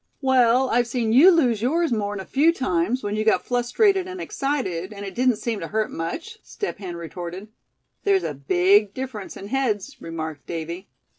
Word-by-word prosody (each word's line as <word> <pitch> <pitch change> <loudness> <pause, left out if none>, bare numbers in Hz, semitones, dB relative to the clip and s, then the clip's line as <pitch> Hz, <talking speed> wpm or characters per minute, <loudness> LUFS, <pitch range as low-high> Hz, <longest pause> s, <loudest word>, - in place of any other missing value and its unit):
"Well, 260 -1 +4
I've 240 0 +2
seen 235 -2 -1
you 295 +10 +8
lose 255 - +3
yours 320 +6 +1
more'n 205 -3 -1
a 190 - -6
few 300 +5 +3
times, 230 - -1
when 205 0 -2
you 215 - 0
got 220 - +2
flustrated 365 - +2
and 370 0 -7
excited; 245 - -2
and 200 -1 -7
it 195 - -6
didn't 250 -1 +2
seem 225 0 -3
to 165 - -5
hurt 215 +3 -1
much," 330 - -5
Step 410 - -5
Hen 180 -4 -6
retorted. 175 +4 -7 0.5
"There's 395 -2 +3
a - - -2
big 190 +9 +3
difference 255 -6 -6
in 200 - -9
heads," 265 -1 -1
remarked 160 -3 -6
Davy. 170 +3 -5
220 Hz, 180 wpm, -23 LUFS, 185-265 Hz, 0.5 s, you